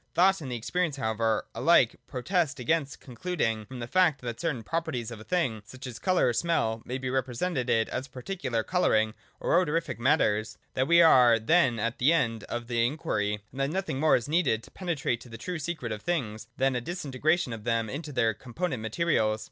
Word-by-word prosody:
Thought 190 +1 +4
and 135 -4 -6
experience 155 +7 -1
however 110 -3 0
alike - - +4
protest 145 +1 -1
against 145 +3 -1
concluding 120 - -2
from 130 - -8
the 120 - -4
fact 165 -1 +3
that 120 -2 -5
certain 150 -9 -2
properties 135 -5 -3
of 115 - -8
a - - -10
thing, 130 -9 -1
such 130 +6 -11
as 125 -2 -7
colour, 185 -8 +2
or - - 0
smell, 115 -7 0
may 125 - -3
be 130 -1 -3
represented 130 +2 -1
as 120 +4 0
particular 130 -4 -3
colour 180 -2 +2
ing 110 0 +2 0.3
or 175 +2 +3
odorific 155 -6 -2
matters, 115 -5 +2 0.2
that 130 +1 0
we 170 +1 +7
are 125 -7 +7
then 125 +1 +3
at 115 +2 -2
the 135 +6 +4
end 115 -9 0
of 120 0 -4
the 115 -1 0
inquiry, 115 -7 -1
and 130 - -9
that 135 0 +1
nothing 185 -5 -2
more 155 +1 +5
is 120 - -1
needed 145 -9 +1
to - - -15
penetrate 155 -10 -2
to 125 - -13
the 115 - -8
true 180 +2 -4
secret 150 -7 -4
of 105 -1 -4
things 115 -10 -2
than 135 -1 +2
a 125 - -1
disintegration 155 -1 -1
of 110 -2 -7
them 115 -1 0
into 150 +6 -6
their 120 -4 +2
component 130 - -4
materials. 110 -3 +1
130 Hz, 200 wpm, -28 LUFS, 115-165 Hz, 0.3 s, we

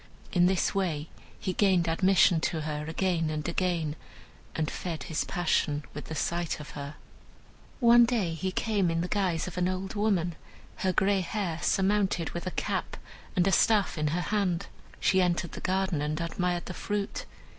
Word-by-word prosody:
In 180 -1 +4
this 190 -1 +1
way 165 -6 -1 0.3
he 185 - -2
gained 185 -3 +3
admission 180 0 +4
to 160 - -3
her 150 -1 -3
again 165 -1 0
and 155 +1 -3
again, 170 -3 0 0.6
and 155 -2 -1
fed 170 -3 -4
his 160 -3 -1
passion 160 -4 0
with 150 - -7
the 160 - -6
sight 170 +1 -1
of 150 - -9
her. 145 +1 -7 0.8
One 240 -1 +7
day 220 -9 0
he 185 +3 -2
came 200 -2 +1
in 165 0 0
the 175 - -2
guise 185 -5 0
of 180 0 -5
an 180 - +2
old 185 +1 -3
woman, 200 -5 +1 0.4
her 190 - +1
gray 195 +1 +2
hair 180 -3 -2
surmounted 195 -3 +1
with 175 +1 -5
a 185 - -5
cap, - - -2 0.4
and 180 -2 +3
a 195 - +3
staff 205 +2 +3
in 155 -2 0
her 170 +4 0
hand. 195 -2 0 0.3
She 190 -1 +3
entered 175 -1 0
the - - -8
garden 185 -4 0
and 150 +1 -1
admired 175 +1 -1
the 180 - -5
fruit. 205 +2 -3
180 Hz, 175 wpm, -29 LUFS, 165-195 Hz, 0.8 s, One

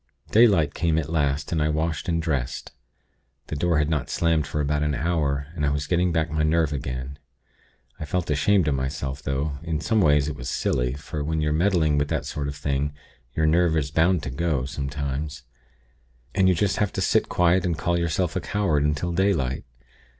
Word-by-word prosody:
"Daylight 100 -11 +5
came 80 -2 +1
at 80 0 -2
last, 70 -3 0
and 80 -2 0
I 75 - +2
washed 80 +3 -1
and 85 -1 +1
dressed. 75 -7 -2 0.8
The - - -3
door 85 +2 +1
had 75 0 +2
not 75 -6 -1
slammed 80 -3 +1
for 75 - -3
about 75 0 0
an 75 -1 0
hour, 75 -4 0
and 80 -4 -4
I 70 - +3
was 70 0 -1
getting 90 +1 +1
back 80 -2 0
my 80 0 0
nerve 80 -1 +2
again. 65 +1 -5 0.8
I 75 - -4
felt 85 +2 -2
ashamed 80 +5 +3
of 75 - +2
myself; 70 +1 -3
though, 70 +1 -2
in 80 -2 -2
some 110 +3 +1
ways 75 -4 +4
it 75 - -3
was 60 -2 -6
silly; 60 0 0
for 75 0 -5
when 80 +2 -1
you're 75 -1 +1
meddling 80 -3 +2
with 70 - 0
that - - -2
sort 70 -1 -3
of 70 - -4
thing, 70 0 -2 0.4
your 80 - +2
nerve 80 +1 +3
is 70 -2 -1
bound 80 +1 +2
to 70 - -4
go, 70 -2 -1
sometimes. 70 +1 -4 0.9
And 95 -1 +4
you 90 - +3
just 100 +3 +1
have 105 -2 +1
to - - -2
sit - - +2
quiet 90 +1 +3
and 85 -4 -1
call 85 -1 0
yourself 85 +2 -1
a 95 - 0
coward 95 -9 0
until 75 +4 0
daylight. 85 -9 0
75 Hz, 200 wpm, -24 LUFS, 70-85 Hz, 0.9 s, Daylight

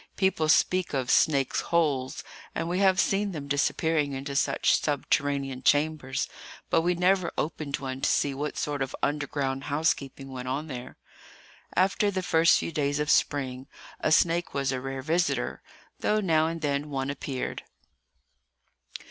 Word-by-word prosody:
People 185 -5 +1
speak 180 0 +3
of 130 -2 0
snakes' 140 -4 +3
holes, 145 -6 0 0.3
and 165 - -2
we 180 +2 -1
have 190 -2 +4
seen 200 0 +1
them 145 -3 -6
disappearing 145 +1 +1
into 140 +1 -5
such - - +2
subterranean 140 -2 -1
chambers; 145 -2 +1 0.4
but - - +4
we 175 +2 +1
never 180 0 +2
opened 150 -2 -2
one 130 -1 -5
to - - +2
see 140 - +1
what 145 +2 -4
sort 145 -2 -2
of 135 0 -2
underground 140 -2 -1
housekeeping 140 -2 -1
went 130 -1 -6
on 135 +4 -2
there. 125 -5 -8 0.8
After 195 +2 +2
the 190 -2 -2
first 165 0 +4
few - - -3
days 145 -2 0
of 150 +2 +1
spring, 130 -2 +1 0.3
a 155 - 0
snake 170 +2 +2
was 135 -1 0
a 130 -1 -3
rare 135 0 -5
visitor, 170 +4 0 0.4
though 215 - +1
now 160 -5 +2
and 165 0 -4
then 145 0 -1
one 135 -1 -2
appeared. 135 -2 -4
145 Hz, 155 wpm, -27 LUFS, 135-165 Hz, 0.8 s, have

